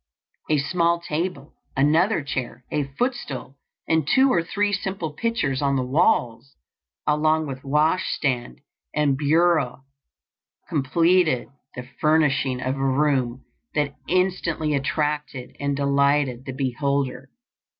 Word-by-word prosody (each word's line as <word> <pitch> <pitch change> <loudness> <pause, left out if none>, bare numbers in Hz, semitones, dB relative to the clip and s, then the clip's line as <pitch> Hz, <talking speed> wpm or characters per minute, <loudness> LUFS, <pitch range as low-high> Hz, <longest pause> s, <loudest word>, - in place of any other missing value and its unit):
A 155 - +3
small 170 +3 +1
table, 170 -2 -4 0.2
another 160 +6 +3
chair, 125 -3 -5
a 150 -2 0
footstool, 240 - -3 0.3
and 160 -3 +1
two 265 - +4
or 170 - +3
three 205 +4 -1
simple 190 -6 -3
pictures 150 - -1
on 140 -1 +1
the 130 -1 0
walls, 125 -2 +1 0.5
along 155 +1 +2
with 135 -2 -7
wash 150 +6 +1
stand 125 - -2 0.3
and 150 -2 +2
bureau, 150 -2 +2 0.8
completed 165 0 +2 0.3
the 125 0 -7
furnishing 145 -4 +2
of 130 +2 -1
a 135 - -2
room 135 -2 +1 0.3
that 145 -1 0
instantly 175 -4 0
attracted 150 -2 -2
and 140 0 -1
delighted 140 -2 +1
the 135 - -5
beholder. 135 0 -2
145 Hz, 120 wpm, -23 LUFS, 135-165 Hz, 0.8 s, two